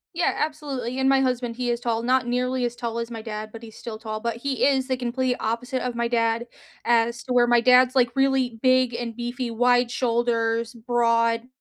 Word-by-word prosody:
Yeah, 345 - +2
absolutely, 275 -5 -3
and 265 0 +3
my 270 0 +4
husband, 250 -2 -1
he 245 0 -1
is 235 - -2
tall- 230 -1 -2
not 255 0 +2
nearly 250 +1 0
as 240 0 -3
tall 235 -1 -4
as 230 0 -4
my 225 -2 -7
dad, 215 -1 -6
but 225 +1 -11
he's 220 -1 -11
still 230 -2 -7
tall- 215 -1 -5
but 235 0 -3
he 265 +2 -2
is 265 -2 +2
the 260 - 0
complete 250 0 -1
opposite 245 +4 -2
of 250 -1 -3
my 235 0 0
dad 230 0 0 0.4
as 235 +1 +1
to 255 - -3
where 240 -1 +4
my 240 -1 +4
dad's 250 +1 +5
like 245 -2 +2
really 265 -4 +1
big 255 -1 +3
and 235 -1 -4
beefy, 240 +1 -4
wide 245 +1 +2
shoulders, 230 -1 0
broad. 230 0 +1
240 Hz, 210 wpm, -24 LUFS, 230-255 Hz, 0.4 s, dad's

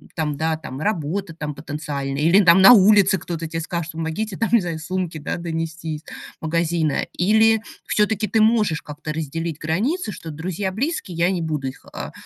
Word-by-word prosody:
там, 155 -3 -1
да, 160 0 -1 0.2
работа 175 0 -2
там 150 -2 -4
потенциальная, 145 -2 -4
или 170 +5 +6
на 190 +3 +8
улице 200 -2 +5
кто-то 165 -1 -5
тебе 165 +1 -4
скажет: 170 0 -4
"Помогите 165 +6 -3
там 225 - 0 0.3
сумки 180 0 -3
донести 165 0 -4
из - - -14 0.4
магазина"- 160 -1 0
или 220 +4 +4 0.2
всё-таки 215 0 +1
ты 220 - +2
можешь 215 -7 +3
как-то 150 +1 -7
разделить 160 +1 -4
границы, 210 - -1
что 165 -4 -8
друзья 185 +5 -3
близкие- 215 - -3
я 170 +1 +3
не 180 - -1
буду 150 -4 -2
их, 130 - -9
а, - - -6
170 Hz, 155 wpm, -22 LUFS, 155-200 Hz, 0.4 s, на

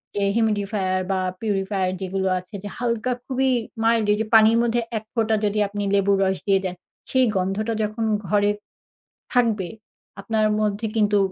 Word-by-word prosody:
যে 200 - 0
humidfier 205 -4 0
বা, 190 - +1 0.2
purifier 195 -3 0
যেগুলো 190 0 -1
আছে, 180 +3 -17
যে 205 - -5
হালকা 240 0 -1
খুবই 265 0 +1 0.3
mild 230 -2 +3
এইযে 220 +1 -1
পানির 220 +1 +7
মধ্যে 240 0 +1 0.2
এক 215 - -5
ফোঁটা 225 -2 +1
যদি 210 +1 0
আপনি 205 0 -3
লেবুর 200 0 +3
রস 190 -1 +1
দিয়ে 195 -1 +3
দেন, 180 -1 -3 0.4
সেই 260 -1 +4
গন্ধটা 200 +5 -1
যখন 215 +2 -2 0.2
ঘরে 205 +2 +3 0.8
থাকবে, 225 -7 +2 0.5
আপনার 215 +1 +1
মধ্যে 210 +1 0
কিন্তু 210 -1 +3
210 Hz, 155 wpm, -23 LUFS, 195-225 Hz, 0.8 s, পানির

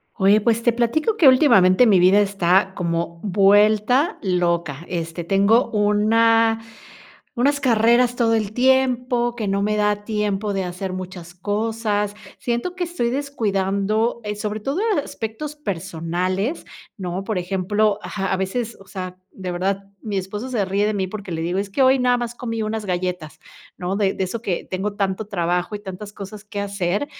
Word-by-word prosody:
Oye, 205 +1 +4
pues 230 +1 +2
te 240 0 +2
platico 305 - 0
que 320 - +6
últimamente 245 -6 +6
mi 200 -3 +5
vida 185 +3 +5
está 190 -1 +2
como 170 -1 -2
vuelta 210 - +3
loca, 170 -5 -1
este, 170 -1 -4
tengo 200 +7 +3
una 225 +2 +3 0.8
unas 280 +3 +1
carreras 240 0 +3
todo 230 -2 +2
el 215 -2 -1
tiempo 250 -1 +2
que 220 - -3
no 195 0 0
me 210 +1 0
da 210 0 0
tiempo 210 -1 -1
de 195 -1 -1
hacer 180 +1 -5
muchas 180 -2 -8
cosas, 210 +1 -1 0.2
siento 240 +9 -2
que 365 -1 -2
estoy 330 -9 -2
descuidando, 215 -4 -1
eh, 210 0 -3
sobre 210 0 -3
todo 275 - -2 0.2
aspectos 225 +7 -6
personales, 185 - -3 0.3
¿no? 185 -1 -4
Por 215 +1 -2
ejemplo 200 +3 0
ajá, 195 -2 -3
a - - +2
veces, 220 +5 -3
o 195 - -15
sea, 185 -2 -7
de 185 -2 -6
verdad, 195 +3 -1 0.2
mi 210 -3 -4
esposo 205 +6 -4
se 235 -6 0
ríe 195 +2 0
de 215 - 0
mí 190 -2 -1
porque 200 -1 -7
le 165 -1 -3
digo: 175 +3 -1
"Es 200 0 -2
que 200 +7 0
hoy 260 +1 +5
nada 250 -1 +3
más 240 -1 -4
comí 230 -2 -4
unas 215 0 -3
galletas", 180 -3 -3 0.4
¿no? 180 +1 -3
De 200 -2 +1
de 190 - -1
eso 205 +5 -4
que 190 -6 -2
tengo 195 +2 -2
tanto 200 +1 -2
trabajo 180 0 -1
y - - -3
tantas 205 +1 -8
cosas 200 +1 -8
que 210 -1 -8
hacer, 200 +3 -1
205 Hz, 170 wpm, -21 LUFS, 190-230 Hz, 0.8 s, que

